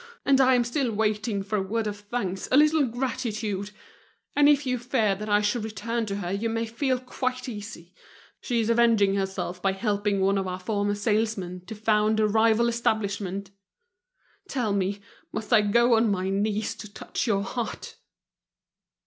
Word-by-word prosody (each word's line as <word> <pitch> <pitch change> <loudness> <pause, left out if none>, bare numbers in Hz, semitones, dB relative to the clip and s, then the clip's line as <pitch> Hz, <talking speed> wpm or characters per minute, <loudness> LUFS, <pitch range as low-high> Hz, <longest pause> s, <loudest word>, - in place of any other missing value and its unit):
And 270 -1 +5
I 260 0 +5
am 245 - +3
still 240 +1 -1
waiting 210 -1 -1
for 210 +2 -2
a - - +1
word 220 +4 -2
of 205 -1 -4
thanks, 205 -3 -4
a 260 - +5
little 305 -1 +4
gratitude. 220 -5 -3 0.7
And 290 0 +6
if 290 -1 +3
you 250 -1 0
fear 230 -4 +1
that 210 +3 -6
I 205 0 +4
should 210 +2 0
return 220 +2 -3
to 200 - -3
her, 180 -3 -4
you 205 +4 -1
may 225 +1 -1
feel 255 +3 -1
quite 255 0 -3
easy: 205 -6 -8 0.5
she 240 -2 -1
is 225 +1 +1
avenging 230 -4 +4
herself 190 -2 -3
by 195 0 +1
helping 205 0 0
one 195 +1 +2
of 190 - -2
our 180 0 -4
former 205 +1 -1
salesmen 205 -4 -1
to 220 - -6
found 215 0 +2
a 215 - +4
rival 225 +2 +3
establishment. 200 -4 -1 1.0
Tell 240 - -1
me, 200 +1 -1 0.3
must 220 0 -3
I 215 - +7
go 235 +4 +3
on 225 0 +4
my 190 -1 -1
knees 205 +2 0
to 210 -2 -9
touch 215 - -4
your 200 -3 +1
heart?" 230 +2 -5
215 Hz, 175 wpm, -26 LUFS, 200-235 Hz, 1.0 s, I